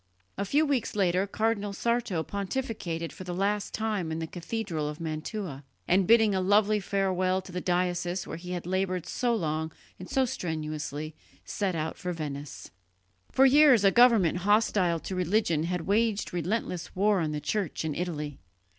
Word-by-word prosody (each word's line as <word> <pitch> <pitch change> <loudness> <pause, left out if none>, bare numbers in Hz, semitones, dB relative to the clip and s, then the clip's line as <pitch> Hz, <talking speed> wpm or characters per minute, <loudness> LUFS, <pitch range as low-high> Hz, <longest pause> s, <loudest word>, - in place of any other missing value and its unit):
A 200 - -2
few 295 +10 +3
weeks 265 -8 -1
later 190 -1 +2
Cardinal 210 -1 -1
Sarto 235 -6 0
pontificated 195 -5 -3
for - - -9
the 180 -1 -5
last 200 +2 0
time 210 -7 -2
in 160 - -2
the 165 - -3
cathedral 175 -3 -3
of 150 - -7
Mantua, 160 - -5 0.2
and, 185 0 +3
bidding 220 -3 +5
a 190 - +1
loving 205 +2 +3
farewell 185 -1 +1
to 185 - -11
the 180 0 -3
diocese 175 0 0
where - - -6
he 180 +1 -6
had 175 -2 -4
laboured 185 -1 -1
so 240 -2 0
long 160 -4 -2 0.3
and 185 - -9
so 265 -1 +2
strenuously, 155 - -4 0.3
set 195 -4 -2
out 160 0 -3
for 180 -1 -3
Venice. 145 -3 -6 0.6
For 265 - +5
years 270 -5 +6
a 195 - +6
government 225 -9 +5
hostile 195 -3 +2
to - - -5
religion 180 -3 +1
had 180 0 -2
waged 210 +3 0
relentless 180 0 -2
war 200 +1 +3
on 155 -3 -1
the 150 - -2
Church 165 +1 -2
in 155 - -1
Italy. 150 -4 -4
185 Hz, 170 wpm, -28 LUFS, 165-210 Hz, 0.6 s, years